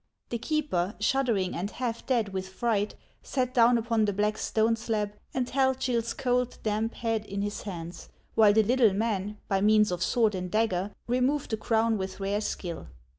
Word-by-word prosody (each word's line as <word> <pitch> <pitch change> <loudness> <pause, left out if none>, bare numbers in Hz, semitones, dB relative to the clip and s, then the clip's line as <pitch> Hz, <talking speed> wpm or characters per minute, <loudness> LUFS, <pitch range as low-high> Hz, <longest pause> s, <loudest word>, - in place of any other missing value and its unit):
The 235 - -2
keeper, 225 - -1
shuddering 220 -6 +1
and 185 +4 -2
half 235 0 -4
dead 235 -6 +1
with 190 0 -3
fright, 210 +1 -1 0.3
sat 255 -2 -2
down 240 -1 +5
upon 230 -1 +1
the 205 - 0
black 210 +2 +1
stone 225 +1 +2
slab, 215 -3 -2 0.2
and 255 -2 -1
held 265 0 +1
Gill's 235 -3 -1
cold, 250 -1 0
damp 215 +1 -1
head 225 -2 -1
in 200 -1 -4
his 205 0 -3
hands, 175 -4 -7 0.2
while 215 -2 +6
the 220 +1 +5
little 230 -2 +4
man, 210 -1 -1
by 195 -1 +1
means 210 -1 +4
of 180 0 -3
sword 220 +1 +2
and 185 -1 -3
dagger, 205 -2 0
removed 255 +4 0
the 220 - 0
crown 225 0 +1
with 190 +1 -5
rare 200 +2 -1
skill. 175 -5 -4
220 Hz, 180 wpm, -28 LUFS, 200-240 Hz, 0.3 s, while